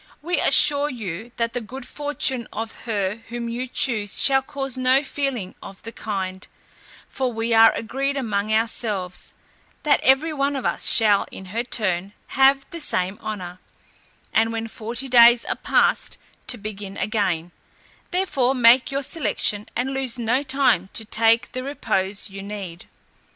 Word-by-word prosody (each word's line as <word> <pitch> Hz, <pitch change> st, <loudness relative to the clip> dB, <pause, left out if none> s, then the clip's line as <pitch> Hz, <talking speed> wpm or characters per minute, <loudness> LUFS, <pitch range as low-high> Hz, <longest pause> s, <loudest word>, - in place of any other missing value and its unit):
We 350 Hz, +3 st, -1 dB
assure 290 Hz, 0 st, +5 dB
you, 220 Hz, -, -6 dB
that 230 Hz, 0 st, -1 dB
the 245 Hz, -, -2 dB
good 255 Hz, +5 st, -9 dB
fortune 290 Hz, -5 st, -2 dB
of 225 Hz, +1 st, -5 dB
her 205 Hz, -3 st, -2 dB
whom 235 Hz, 0 st, -5 dB
you 240 Hz, +2 st, -4 dB
choose 215 Hz, -5 st, 0 dB
shall 270 Hz, -1 st, +5 dB
cause 270 Hz, -2 st, -4 dB
no 260 Hz, +2 st, +2 dB
feeling 265 Hz, -9 st, -3 dB
of 195 Hz, +1 st, -12 dB
the 230 Hz, -, -7 dB
kind; 190 Hz, -4 st, -5 dB, 0.6 s
for 260 Hz, -2 st, -2 dB
we 225 Hz, 0 st, -2 dB
are 225 Hz, 0 st, +7 dB
agreed 275 Hz, +5 st, -3 dB
among 215 Hz, -4 st, -2 dB
ourselves, 215 Hz, -4 st, -2 dB, 0.5 s
that 300 Hz, -, +3 dB
every 270 Hz, +5 st, +3 dB
one 280 Hz, 0 st, -1 dB
of 265 Hz, -, -4 dB
us -, -, +4 dB
shall 210 Hz, -3 st, +5 dB
in 190 Hz, -, -10 dB
her 230 Hz, -, 0 dB
turn 200 Hz, -5 st, -1 dB, 0.2 s
have 270 Hz, +1 st, +3 dB
the 335 Hz, -, -6 dB
same 190 Hz, -, -2 dB
honour; 185 Hz, -4 st, -6 dB, 0.7 s
and 225 Hz, +1 st, +2 dB
when 225 Hz, 0 st, -4 dB
forty 235 Hz, +4 st, -6 dB
days 240 Hz, -1 st, +6 dB
are -, -, -1 dB
past, -, -, +1 dB, 0.3 s
to 245 Hz, -, +1 dB
begin 205 Hz, -2 st, -7 dB
again; 185 Hz, -6 st, -1 dB, 0.6 s
therefore 280 Hz, -9 st, 0 dB
make 245 Hz, +1 st, +5 dB
your 275 Hz, +1 st, -2 dB
selection, 215 Hz, -8 st, -1 dB
and 260 Hz, +3 st, -2 dB
lose 265 Hz, -3 st, -1 dB
no 240 Hz, +3 st, 0 dB
time 265 Hz, -10 st, +1 dB
to 225 Hz, -, -2 dB
take 225 Hz, 0 st, +2 dB
the 255 Hz, -, -5 dB
repose 210 Hz, -8 st, -2 dB
you 195 Hz, -1 st, -9 dB
need." 195 Hz, -3 st, -8 dB
230 Hz, 155 wpm, -22 LUFS, 205-265 Hz, 0.7 s, are